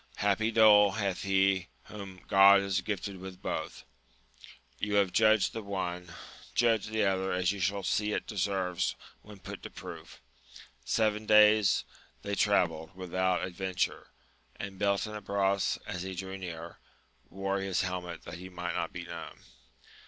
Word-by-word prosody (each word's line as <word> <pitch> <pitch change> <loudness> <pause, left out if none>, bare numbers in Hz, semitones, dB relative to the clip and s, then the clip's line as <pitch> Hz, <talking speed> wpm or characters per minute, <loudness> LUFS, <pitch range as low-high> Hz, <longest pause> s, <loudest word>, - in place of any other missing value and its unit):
happy 105 +2 +1
dole 105 -3 +6
hath 100 -4 -2
he 95 -2 +2 0.2
whom 95 -3 -10
God 100 0 +7
has 95 -1 0
gifted 100 0 -4
with 95 0 -9
both! - - -4 1.0
You 105 0 -1
have 100 -2 +3
judged 110 -3 +4
the 115 - -4
one, 90 -3 -4 0.4
judge 115 -4 +2
the 110 0 0
other 95 0 0
as 90 0 +1
you 100 - -5
shall 100 +2 0
see 105 +4 0
it - - -2
deserves 95 -3 -1 0.3
when 105 -1 -13
put - - -9
to - - -8
proof. - - -10 0.6
Seven 110 - 0
days 105 -1 +5 0.4
they 100 - -3
travelled 90 -5 +1
without 95 0 0
adven 95 0 -4
ture, - - -1 0.5
and 95 -1 -7
Beltenebros, 100 -1 0
as 90 - -5
he 95 0 -5
drew 95 +1 -5
nearer, 85 -3 -7 0.5
wore 95 +1 -2
his 95 -1 0
helmet 90 -2 -4
that 85 0 -8
he 95 +1 -9
might 90 -1 -4
not 85 - -2
be 90 -1 -7
known. 85 -1 -8
95 Hz, 150 wpm, -30 LUFS, 90-105 Hz, 1.0 s, God